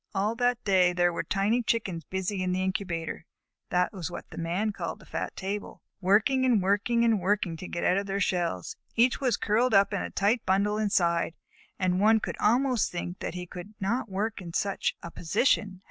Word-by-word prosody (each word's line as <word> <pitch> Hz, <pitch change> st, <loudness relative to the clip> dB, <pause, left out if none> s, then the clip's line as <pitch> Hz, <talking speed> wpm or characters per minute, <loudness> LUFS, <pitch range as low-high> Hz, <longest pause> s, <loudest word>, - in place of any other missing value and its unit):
All 205 Hz, +3 st, +1 dB
that 245 Hz, -1 st, +1 dB
day 185 Hz, -3 st, +4 dB
there 175 Hz, -1 st, +2 dB
were -, -, -1 dB
tiny 200 Hz, +8 st, +1 dB
Chickens 195 Hz, -9 st, -1 dB
busy 190 Hz, +2 st, -2 dB
in 180 Hz, 0 st, 0 dB
the 185 Hz, +1 st, 0 dB
incubator 180 Hz, -5 st, -3 dB, 0.4 s
(that 180 Hz, +4 st, +1 dB
was 185 Hz, -3 st, -4 dB
what 175 Hz, -, -8 dB
the -, -, -10 dB
Man 180 Hz, +6 st, -1 dB
called -, -, -5 dB
the -, -, -17 dB
fat -, -, -4 dB
table), 200 Hz, +1 st, -5 dB, 0.2 s
working 215 Hz, +8 st, +3 dB
and 245 Hz, -4 st, +4 dB
working 205 Hz, +5 st, +2 dB
and 225 Hz, -3 st, +3 dB
working 190 Hz, -2 st, 0 dB
to 185 Hz, -, -7 dB
get 170 Hz, -, -4 dB
out 180 Hz, -, +3 dB
of 200 Hz, 0 st, -2 dB
their 195 Hz, 0 st, -1 dB
shells. 175 Hz, -, -1 dB, 0.2 s
Each 240 Hz, +3 st, +3 dB
was 250 Hz, -5 st, +2 dB
curled 225 Hz, +2 st, +2 dB
up 195 Hz, +1 st, +4 dB
in 200 Hz, -, 0 dB
a -, -, -4 dB
tight 210 Hz, +4 st, +1 dB
bunch 195 Hz, +2 st, +2 dB
inside, 180 Hz, -6 st, +1 dB, 0.4 s
and 185 Hz, -1 st, +1 dB
one 220 Hz, +2 st, +5 dB
would -, -, -5 dB
almost 245 Hz, +1 st, +2 dB
think 175 Hz, +1 st, -5 dB
that -, -, -4 dB
he 180 Hz, 0 st, -5 dB
could 180 Hz, +4 st, -10 dB
not 225 Hz, +4 st, -1 dB
work 205 Hz, +2 st, -2 dB
in 170 Hz, -2 st, -8 dB
such 200 Hz, +2 st, 0 dB
a 170 Hz, -, -7 dB
position. 195 Hz, +2 st, +1 dB
195 Hz, 205 wpm, -28 LUFS, 180-220 Hz, 0.4 s, one